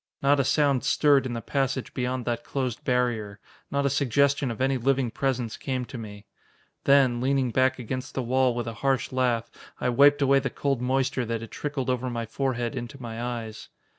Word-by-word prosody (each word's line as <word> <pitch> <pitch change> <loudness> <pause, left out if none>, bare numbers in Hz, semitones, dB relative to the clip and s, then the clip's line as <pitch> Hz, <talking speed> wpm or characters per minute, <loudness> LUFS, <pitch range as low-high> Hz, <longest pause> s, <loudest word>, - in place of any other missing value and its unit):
Not 140 +1 +4
a - - +4
sound 140 -2 +2
stirred 140 -3 +3
in 120 - -4
the 115 -2 -5
passage 135 0 -1
beyond 125 -1 -2
that 120 -1 -2
closed 130 -4 -3
barrier. 120 -5 0 0.3
Not 140 0 0
a - - +3
suggestion 140 +1 +2
of 115 - -5
any 135 +1 +2
living 130 -1 +1
presence 125 -4 -2
came 130 -2 -3
to 125 - -8
me. 105 -2 -9 0.6
Then, 135 -4 +4
leaning 130 -1 +1
back 130 +2 +2
against 130 +1 -5
the 130 - -1
wall 130 0 +2
with 120 -1 -2
a 115 - -4
harsh 135 -4 +1
laugh, 125 -3 0 0.3
I 125 - 0
wiped 145 +3 +5
away 135 0 +5
the 135 - -2
cold 135 -3 -1
moisture 130 0 0
that 115 0 -3
had 115 - -9
trickled 145 -3 -3
over 125 0 -2
my 115 -1 -3
forehead 120 +1 -2
into 125 +3 -6
my 115 -2 -6
eyes. 115 -3 -5
130 Hz, 195 wpm, -26 LUFS, 120-135 Hz, 0.6 s, wiped